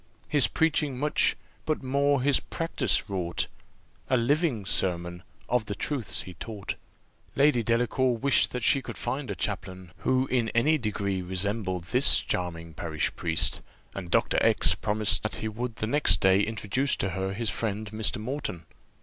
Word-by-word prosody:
His 145 -3 +5
preaching 150 -4 +1
much, 150 +3 +2 0.3
but 155 -3 -2
more 140 0 +2
his 140 0 +3
practice 150 - -1
wrought, 90 -4 -2 0.6
A 130 - +3
living 125 - +1
sermon 85 -2 -1 0.3
of 125 -3 +1
the 100 - -4
truths 130 -1 -2
he 90 - -9
taught." 105 +1 -6 0.6
Lady 140 -3 +4
Delacour 120 +2 +1
wished 135 +3 +3
that 125 -2 -4
she 135 - +4
could - - -8
find 135 -2 -3
a 100 - -3
chaplain, 95 +2 -4
who 130 +6 +1
in 120 -4 0
any 150 +7 +3
degree 100 -4 -2
resembled 95 0 -1
this 85 - +5
charming 85 -2 -4
parish 80 -1 -2
priest, 85 -1 +2 0.3
and 90 -3 -6
Dr. - - +2
X - - +4
promised 105 0 0
that 110 - -3
he 110 - -4
would 115 +2 -4
the 110 - -2
next 145 +7 +2
day 95 0 +4
introduce 110 +6 0
to 95 - -1
her 95 +2 -3
his 115 +2 -1
friend 105 -1 -3
Mr. 110 +1 0
Moreton. 110 - -4
110 Hz, 160 wpm, -27 LUFS, 95-130 Hz, 0.6 s, His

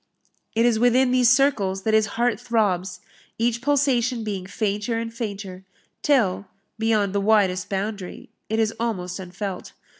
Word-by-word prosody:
It 230 +1 +3
is 235 -2 +3
within 250 +2 +4
these 250 -2 +4
circles 225 -8 +2
that 220 - 0
his 215 -1 +4
heart 235 -3 +1
throbs, 200 -6 -1 0.4
each 235 0 0
pulsation 255 -4 +1
being 195 -4 -4
fainter 210 +2 -2
and 230 0 -4
fainter, 200 -5 -6 0.4
till, 205 -9 +2 0.3
beyond 215 -3 +1
the 200 - +1
widest 200 -2 +2
boundary, 195 -1 -5 0.2
it 220 - 0
is 225 0 +1
almost 185 -6 -3
unfelt. 185 +1 -6
220 Hz, 145 wpm, -23 LUFS, 195-235 Hz, 0.4 s, within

